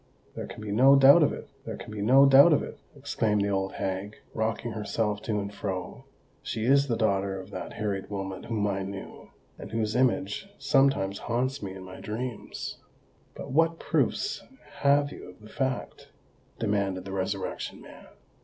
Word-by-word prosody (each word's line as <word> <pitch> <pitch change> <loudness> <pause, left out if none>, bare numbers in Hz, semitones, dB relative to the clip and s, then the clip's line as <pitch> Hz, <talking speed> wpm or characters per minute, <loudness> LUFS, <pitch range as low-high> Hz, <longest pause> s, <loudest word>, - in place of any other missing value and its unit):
"There - - -6
can 105 - -9
be 105 - -4
no 130 +6 +6
doubt 140 +4 +8
of 150 - +4
it—there - - -8
can - - -9
be 105 -1 -5
no 130 +6 +6
doubt 140 +4 +8
of 145 - +2
it," - - -8 0.2
exclaimed 115 -7 0
the 100 - 0
old 95 -1 -1
hag, 95 +2 -3 0.2
rocking 110 +1 -2
herself 105 -1 -2
to 105 -2 -1
and 100 0 -5
fro. 95 -3 -5 0.4
"She 110 - -3
is 140 +2 +4
the 115 -3 0
daughter 100 -3 0
of 95 +2 -10
that 95 - -6
Harriet 100 -2 -3
Wilmot 95 -1 -5
whom 110 -3 -1
I 100 -1 -1
knew, 95 0 -8 0.3
and - - -8
whose 110 -1 -1
image 125 - +1
sometimes 135 -8 +2
haunts 130 +4 -1
me 95 -2 -6
in 95 - -9
my 95 0 -10
dreams." 115 +2 -5 0.6
"But - - -7
what 165 +3 +3
proofs 410 - 0 0.4
have 145 0 +3
you - - -10
of 90 - -15
the 105 0 -14
fact?" 130 0 -3 0.5
demanded 100 -3 -1
the 100 - -6
Resurrection 95 0 -3
Man. - - -14
105 Hz, 175 wpm, -28 LUFS, 100-130 Hz, 0.6 s, doubt